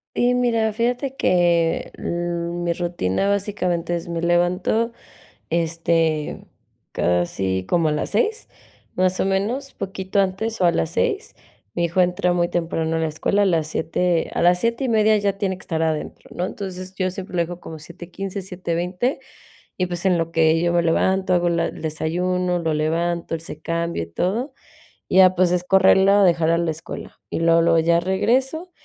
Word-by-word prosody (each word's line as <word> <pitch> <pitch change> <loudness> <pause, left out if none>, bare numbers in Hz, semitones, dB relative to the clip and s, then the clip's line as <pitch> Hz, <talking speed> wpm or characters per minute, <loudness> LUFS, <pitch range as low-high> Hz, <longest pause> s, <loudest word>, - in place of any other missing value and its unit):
Y 245 +1 +3
mira, 230 -3 +1
fíjate 245 +4 -1
que, 170 -4 +1
mm, 175 0 -3
mi 170 0 +1
rutina 175 - -1
básicamente 185 -4 -1
es, 170 0 -5
me 170 -1 -3
levanto, 180 +6 +1 0.6
este, 165 -2 0 0.5
casi 95 +2 0
como 170 -2 +2
a - - +1
las 150 - -2
6, 435 - 0 0.5
más 185 0 +1
o - - +1
menos, 215 +9 -1
poquito 190 0 -2
antes 195 +2 -1
o - - +4
a 175 - +6
las 80 - 0
6. - - -1 0.4
mi 170 - 0
hijo 170 +2 +1
entra 180 0 +2
muy 175 -1 +1
temprano 165 -1 -1
a - - 0
la 160 - 0
escuela, 200 +6 0
a - - +4
las 165 -5 +1
7 165 +2 0
a - - -2
las 180 +1 +4
7 230 +5 0
y - - 0
media 220 -1 +4
ya 200 -1 0
tiene 190 -2 -2
que - - -15
estar 160 -2 -2
adentro, 160 -1 -3
¿no? 180 - -1
Entonces, 185 -1 -7
yo 185 -1 0
siempre 185 -1 -7
lo 170 - +3
dejo 175 +1 -6
como 160 -2 -9
7:15 180 +5 -7
7:20, 180 +6 -2 0.6
y 185 - +1
pues, 175 0 -5
en 180 -3 +3
lo 165 0 -2
que 160 0 +3
yo 170 0 +1
me 170 - +3
levanto, 190 +3 +1
hago 175 -1 +3
la 170 -1 +1
el - - -9
desayuno, 180 +3 -1
lo 160 -2 -1
levanto, 165 +2 -1
él 160 - -4
se 155 -2 -9
cambia 170 - -2
y - - -5
todo, 210 - -1 0.6
y - - 0
ya, 185 -1 +7
pues, 180 0 +2
es 180 -1 +1
correrlo 190 +1 +5
a 200 -1 +5
dejarlo 170 -2 +3
a 170 - +1
la 170 -1 0
escuela. 160 +1 -8
Y - - -3
luego, 165 0 +4
luego 165 0 +4
ya 170 +1 +3
regreso 260 - 0
175 Hz, 185 wpm, -22 LUFS, 165-190 Hz, 0.6 s, ya